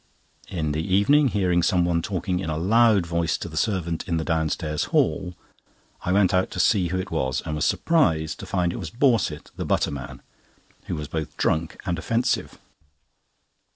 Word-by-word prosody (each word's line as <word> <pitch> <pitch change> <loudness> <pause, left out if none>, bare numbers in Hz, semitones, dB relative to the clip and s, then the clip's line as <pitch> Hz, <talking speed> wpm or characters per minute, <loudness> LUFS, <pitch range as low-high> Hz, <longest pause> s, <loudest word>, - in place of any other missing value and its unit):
In 80 -4 -2
the 75 +2 -1
evening, 100 - +3
hearing 90 -6 +1
someone 85 -1 +2
talking 90 0 -2
in 90 -4 -3
a 75 - -2
loud 105 +2 +4
voice 85 0 0
to - - -6
the 80 - -9
servant 85 -2 -1
in 85 -3 0
the 80 - -1
downstairs 80 -2 -1
hall, 90 -1 0 0.7
I 90 - -2
went 95 -1 +3
out 95 0 +2
to - - -6
see 95 -1 +3
who 95 +2 -2
it 95 +1 -4
was, 65 -5 -1
and 80 - -3
was 75 +2 0
surprised 80 - +1
to - - -8
find 90 -2 0
it - - -5
was 85 - -5
Borset, 115 - +1
the - - -3
butterman, 70 -3 -2 0.6
who - - -3
was 75 -1 -5
both 80 0 -5
drunk 80 +1 0
and 85 -3 -1
offensive. 115 +8 -1
85 Hz, 180 wpm, -24 LUFS, 80-95 Hz, 0.7 s, loud